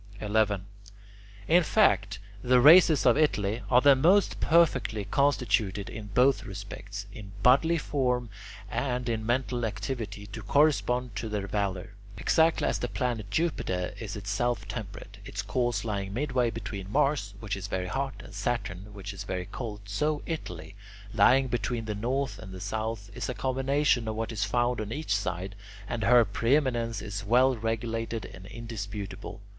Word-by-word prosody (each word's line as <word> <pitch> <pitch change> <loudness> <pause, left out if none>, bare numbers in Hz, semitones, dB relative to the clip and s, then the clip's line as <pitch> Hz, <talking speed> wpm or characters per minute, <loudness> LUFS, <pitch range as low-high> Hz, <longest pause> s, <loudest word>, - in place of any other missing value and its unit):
11. 105 -2 +1 0.8
In 175 +2 +6
fact, 100 - +2 0.2
the 125 +2 +4
races 155 +2 +7
of 125 +2 +5
Italy 110 -7 +1
are 125 0 +5
the 140 0 +7
most 180 +9 +3
perfectly 150 -10 +2
constituted 120 -8 +1
in 110 -1 -7
both 125 +6 +3
respects 100 0 -7
in 100 -2 -10
bodily 160 +7 +5
form 125 -5 0 0.4
and 125 -2 -1
in 115 -2 -1
mental 120 +1 -1
activity 110 -2 -4
to 105 +2 -8
correspond 125 -2 +2
to 110 +2 -4
their 105 -2 -2
valour. 100 0 -2 0.2
Exactly 160 +10 +3
as - - 0
the 120 - -2
planet 120 -5 -2
Jupiter 95 - -1
is 105 -4 -5
itself 105 +2 -2
temperate, 100 -1 -7
its 100 -2 -5
course 115 +1 -1
lying 100 -2 -3
midway 130 -3 +1
between 105 -4 -6
Mars, 120 -7 +1
which 105 -1 -3
is 100 0 -6
very 95 -2 -2
hot, 135 +8 -3
and 105 - -12
Saturn, 100 -2 -3
which 100 0 -6
is 100 - -7
very 90 -1 -4
cold, 105 0 -6
so 145 +9 -1
Italy, 100 - -6 0.4
lying 130 +5 +5
between 120 -1 -2
the 110 - -2
north 130 +6 -2
and 105 -3 -9
the 95 - -8
south, 110 +1 -4
is 125 - -4
a 125 - -3
combination 130 +1 +1
of 110 - -2
what 115 +1 -3
is 105 -2 -1
found 120 +2 0
on 105 0 -5
each 145 -4 -1
side, 95 -1 -3 0.3
and 115 0 -3
her 120 0 +6
preeminence 115 0 0
is 100 -1 -5
well 125 +5 +4
regulated 115 0 -3
and 95 0 -11
indisputable. 105 -2 -7
115 Hz, 160 wpm, -28 LUFS, 100-125 Hz, 0.8 s, races